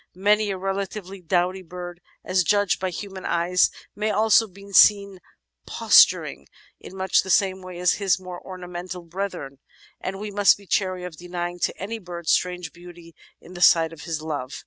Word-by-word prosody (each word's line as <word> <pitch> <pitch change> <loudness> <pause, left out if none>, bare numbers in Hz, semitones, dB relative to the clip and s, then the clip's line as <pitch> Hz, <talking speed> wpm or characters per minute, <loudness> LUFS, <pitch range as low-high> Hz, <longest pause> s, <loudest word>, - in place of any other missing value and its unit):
Many 210 +3 +2
a 195 - -2
relatively 195 0 -5
"dowdy" 180 +2 0
bird 175 0 -9
— - - -36
as 185 0 +2
judged 205 +1 +1
by 185 - -2
human 190 +1 -7
eyes 175 +2 +2
— - - -31
may 215 +1 -1
also 220 +1 +4
be 200 +1 -15
seen 200 -1 +5 0.5
posturing 70 0 +4 0.3
in 190 - -11
much 190 -1 +2
the 190 - -9
same 190 0 +2
way 185 -1 -9
as 180 0 +2
his 195 -1 +2
more 180 -1 -9
ornamental 180 -1 -7
brethren, 170 -6 -6 0.4
and 195 +1 -5
we 210 0 -6
must 205 0 +4
be 200 - -17
chary 185 -2 -1
of 180 -3 -8
denying 175 0 -5
to - - -1
any 225 +4 -5
bird 175 -4 -9
strange 180 -1 0
beauty 175 -1 -14 0.3
in 180 - -14
the 175 - -8
sight 165 -2 +5
of 155 - -12
his 160 -2 -4
love 145 -4 -4
185 Hz, 185 wpm, -24 LUFS, 175-195 Hz, 0.5 s, seen